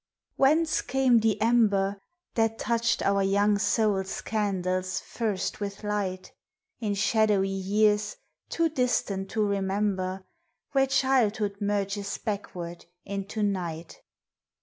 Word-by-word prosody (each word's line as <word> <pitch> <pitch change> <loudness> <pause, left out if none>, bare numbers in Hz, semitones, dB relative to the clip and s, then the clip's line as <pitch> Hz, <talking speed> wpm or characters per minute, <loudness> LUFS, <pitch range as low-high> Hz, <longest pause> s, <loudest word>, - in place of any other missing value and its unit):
WHENCE 310 +4 +3
came 260 -3 +3
the 220 -2 +1
ember 205 -4 +2 0.3
That 225 -1 +1
touched 235 0 0
our 200 0 +2
young 200 +1 +2
souls' 200 -3 +1
candles 185 -3 -1
first 215 -5 -3
with 200 0 -5
light; 200 -3 -3 0.5
In 210 -4 -1
shadowy 210 -1 +2
years, 210 +2 +1 0.3
too 335 -1 +1
distant 245 -8 -1
to 215 +1 0
remember, 195 -1 -1 0.5
Where 270 -1 +3
childhood 225 -7 +1
merges 205 -1 -1
backward 175 -6 -5 0.2
into 200 +2 -3
night? 180 - -3
205 Hz, 105 wpm, -27 LUFS, 195-225 Hz, 0.5 s, WHENCE